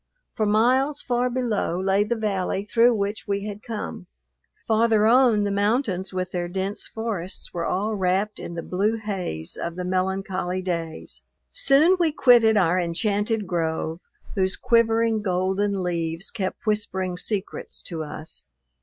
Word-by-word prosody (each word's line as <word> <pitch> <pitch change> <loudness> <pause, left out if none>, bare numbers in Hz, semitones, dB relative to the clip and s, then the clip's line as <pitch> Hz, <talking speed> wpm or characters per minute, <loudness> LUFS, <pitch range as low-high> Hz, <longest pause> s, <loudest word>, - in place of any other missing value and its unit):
For 215 - 0
miles 255 +7 +3
far 245 0 +1
below 235 -8 -1
lay 195 +2 +2
the 235 +3 -1
valley 200 -3 -1
through 235 +2 +4
which 205 +1 -3
we 200 0 -1
had 210 0 -6
come. 220 -4 -6 0.6
Farther 220 -1 +3
on, 235 -2 +5
the 200 - 0
mountains 205 -2 0
with 185 -1 -3
their 175 -1 -2
dense 190 +3 -3
forests 205 -5 -5
were 170 -1 -2
all 205 +4 0
wrapped 195 +2 0
in 170 - -6
the 165 - -4
blue 205 +6 0
haze 185 - -4
of 170 0 -4
the 180 - -4
melancholy 185 0 -1
days. 165 -3 -4 0.3
Soon 360 - +4
we 335 -3 +3
quitted 235 -6 +5
our 180 -2 +3
enchanted 205 +5 0
grove 165 -2 -2 0.3
whose 190 -1 +1
quivering, 230 -2 +2
golden 190 +1 0
leaves 170 0 -2
kept 190 -4 -4
whispering 200 -4 -1
secrets 195 +2 -4
to 165 -3 -5
us. 155 - -8
200 Hz, 145 wpm, -24 LUFS, 180-225 Hz, 0.6 s, on